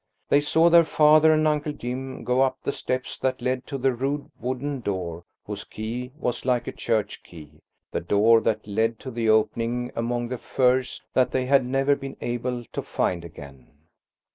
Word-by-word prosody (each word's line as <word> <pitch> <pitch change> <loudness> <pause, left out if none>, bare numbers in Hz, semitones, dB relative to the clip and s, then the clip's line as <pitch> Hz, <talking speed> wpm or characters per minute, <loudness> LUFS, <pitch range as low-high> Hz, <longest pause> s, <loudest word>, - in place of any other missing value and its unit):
They 145 - +5
saw 160 +3 +3
their 170 0 +8
father 155 0 +5
and 155 0 +3
Uncle 150 0 0
Jim 130 +1 -5
go 125 +1 +2
up 130 -1 +2
the - - 0
steps 130 -2 -4
that 130 -1 -1
led 130 0 -2
to 140 - -4
the 135 0 +1
rude 140 +4 -3
wooden 130 +3 -3
door 90 -6 -4 0.2
whose - - -6
key 120 +4 -6
was 125 -6 -2
like 125 -2 +1
a - - -4
church 105 -2 -2
key–the 75 -2 -10
door 110 +5 +4
that 110 -1 -1
led 110 +2 0
to 130 - -6
the 115 -2 -1
opening 115 +3 +1
among 120 +1 -2
the 125 -1 -4
furze 130 0 +1
that 130 - +3
they 130 -1 -1
had 135 0 +4
never 135 +2 +2
been 135 -1 -8
able 120 0 -3
to - - -2
find 85 -2 -1
again. 70 -5 -12
125 Hz, 180 wpm, -25 LUFS, 115-135 Hz, 0.2 s, their